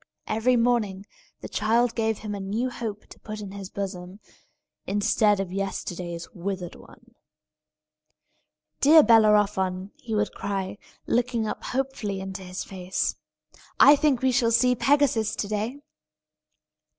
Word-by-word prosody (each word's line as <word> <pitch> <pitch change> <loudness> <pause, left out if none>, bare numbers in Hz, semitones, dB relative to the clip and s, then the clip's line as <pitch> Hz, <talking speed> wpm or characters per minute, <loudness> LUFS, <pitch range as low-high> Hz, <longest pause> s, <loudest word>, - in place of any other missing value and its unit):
Every 225 +4 +1
morning 230 -5 +1 0.4
the - - -6
child 230 +2 +1
gave 220 -2 0
him 210 -1 -6
a 200 - -4
new 215 +6 -2
hope 220 -4 -6
to - - -15
put 215 0 -7
in 200 -2 -7
his 195 -1 -8
bosom, 190 -1 -6 0.7
instead 205 0 +2
of 195 -2 -3
yesterday's 180 -3 -4
withered 185 -1 -5
one. - - -17 1.7
"Dear 310 +2 +7
Bellerophon," 205 -4 +3
he 225 -2 -5
would 210 0 0
cry, 195 0 -4 0.3
looking 240 -1 0
up 215 - -5
hopefully 250 -7 -3
into 190 0 -6
his 185 0 -6
face, 185 -1 -3 0.6
"I 290 - +9
think 285 -4 +1
we 260 - +4
shall 245 -2 +2
see 250 +2 +4
Pegasus 255 -4 +2
to 205 - -3
day!" 215 +5 -3
210 Hz, 135 wpm, -25 LUFS, 195-235 Hz, 1.7 s, I